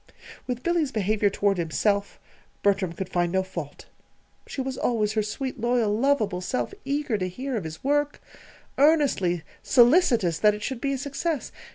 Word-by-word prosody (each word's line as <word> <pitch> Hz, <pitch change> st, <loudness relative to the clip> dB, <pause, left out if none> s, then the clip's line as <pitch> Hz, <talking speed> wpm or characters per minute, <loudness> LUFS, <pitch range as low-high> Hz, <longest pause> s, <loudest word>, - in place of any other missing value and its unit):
With 250 Hz, -1 st, -3 dB
Billy's 340 Hz, -5 st, +1 dB
behavior 210 Hz, -1 st, +1 dB
toward 200 Hz, -1 st, 0 dB
himself, 200 Hz, +5 st, 0 dB, 0.4 s
Bertram 195 Hz, -4 st, +2 dB
could 185 Hz, +2 st, -5 dB
find 175 Hz, -2 st, 0 dB
no 190 Hz, +1 st, +1 dB
fault. 170 Hz, -6 st, -7 dB, 0.6 s
She -, -, -7 dB
was 265 Hz, 0 st, -2 dB
always 215 Hz, -4 st, 0 dB
her 215 Hz, -, +1 dB
sweet, 255 Hz, +5 st, -4 dB
loyal, 235 Hz, -3 st, +2 dB
lovable 225 Hz, -7 st, +1 dB
self, 250 Hz, -, -2 dB
eager 280 Hz, -5 st, -1 dB
to 185 Hz, -1 st, -1 dB
hear 260 Hz, +8 st, -4 dB
of 205 Hz, -7 st, -3 dB
his 160 Hz, 0 st, -8 dB
work, 290 Hz, +1 st, +1 dB, 0.6 s
earnestly 275 Hz, -, +3 dB, 0.2 s
solicitous 240 Hz, -, +4 dB
that 210 Hz, -1 st, +4 dB
it 210 Hz, -, -8 dB
should 260 Hz, -1 st, -4 dB
be 275 Hz, 0 st, 0 dB
a -, -, -1 dB
success. 285 Hz, +3 st, -3 dB
220 Hz, 165 wpm, -25 LUFS, 190-275 Hz, 0.6 s, solicitous